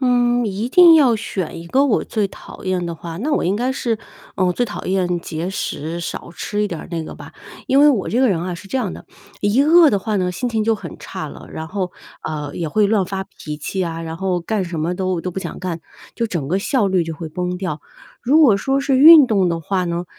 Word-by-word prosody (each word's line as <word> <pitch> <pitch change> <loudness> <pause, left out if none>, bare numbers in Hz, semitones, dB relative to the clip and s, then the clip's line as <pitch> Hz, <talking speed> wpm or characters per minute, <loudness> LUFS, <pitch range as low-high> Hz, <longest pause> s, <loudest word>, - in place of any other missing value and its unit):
嗯， 245 -2 +2
一 205 +4 -3
定 345 +2 +8
要 265 -7 +5
选 185 -6 -4
一 170 - -10
个 270 +10 +3
我 255 - +1
最 210 -3 -1
讨 - - -12
厌 185 -2 -1
的 170 - -4
话， 165 0 -8
那 280 - -2
我 - - +1
应 190 +3 +1
该 250 +3 0
是， 235 -4 -2 0.4
嗯， 185 - +2
我 180 - +2
最 245 +7 0
讨 210 - -7
厌 180 -2 0
节 165 +2 -4
食， 170 -3 -4
少 170 - -6
吃 210 +3 -3
一 205 - 0
点 170 -4 -5
儿 - - -12
那 165 -1 -3
个 - - -8
吧。 - - -11 0.3
因 270 +2 +4
为 295 - +7
我 215 -8 -1
这 245 - +1
个 260 - +4
人 170 -5 +1
啊， 180 0 -3
是 170 +3 -11
这 265 - -1
样 210 -8 -2
的， - - -11 0.4
一 205 +6 +2
饿 320 +1 +6
的 200 - +1
话 215 +2 -3
呢， 180 -2 0
心 245 +7 -3
情 220 -2 0
就 225 +1 +2
很 - - -9
差 - - -6
了， - - -12
然 160 - -6
后， 185 +1 -3 0.3
呃， 150 -2 -5
也 165 -3 -3
会 210 +6 +2
乱 200 -2 +2
发 190 0 -4
脾 150 -5 -8
气 185 +5 -3
啊， 165 -1 -4
然 160 0 -5
后 185 -1 -1
干 200 +3 -2
什 170 -2 -5
么 165 +3 -1
都 185 -2 -1
都 180 0 -4
不 190 - -4
想 - - -6
干， 180 -3 -4 0.3
就 230 - -1
整 165 -9 -3
个 185 +6 0
效 240 -1 +1
率 185 -2 +2
就 165 0 -5
会 160 +1 -7
崩 180 +3 -3
掉。 185 -1 -4 0.4
如 295 +6 +4
果 225 -9 +6
说 270 +6 0
是 275 -1 +1
运 305 -1 +10
动 195 -6 +2
的 170 - -1
话 185 +2 -1
呢， 170 +1 -2
190 Hz, 275 characters per minute, -20 LUFS, 170-235 Hz, 0.4 s, 运